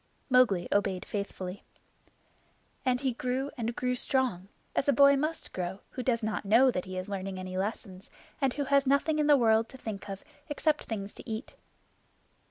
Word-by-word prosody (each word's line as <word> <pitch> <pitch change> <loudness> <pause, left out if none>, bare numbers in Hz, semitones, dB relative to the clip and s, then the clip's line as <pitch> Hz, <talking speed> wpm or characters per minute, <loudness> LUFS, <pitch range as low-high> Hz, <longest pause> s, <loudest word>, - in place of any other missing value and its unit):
Mowgli 225 -9 +4
obeyed 195 -2 +1
faithfully. 200 -2 -5 1.2
And 250 -1 +1
he 265 -3 0
grew 255 +3 -2
and 235 -1 -3
grew 250 0 0
strong 250 -8 0 0.3
as 280 - +1
a - - +6
boy 280 +2 +7
must 310 +4 -3
grow 185 +1 -4
who 255 - -4
does 235 -2 0
not 215 0 -1
know 235 +6 +5
that 180 - -3
he 185 0 -6
is 185 - -4
learning 195 -1 -4
any 185 0 -6
lessons, 190 -1 -4 0.3
and 270 -2 +3
who 290 - 0
has 280 0 +3
nothing 285 +3 +2
in 300 - +2
the 295 -1 +7
world 225 -2 +3
to 265 - -11
think 210 -4 -6
of 195 0 -6 0.3
except 300 +1 0
things 205 -3 -5
to - - -11
eat. 220 +4 -5
230 Hz, 180 wpm, -30 LUFS, 195-265 Hz, 1.2 s, boy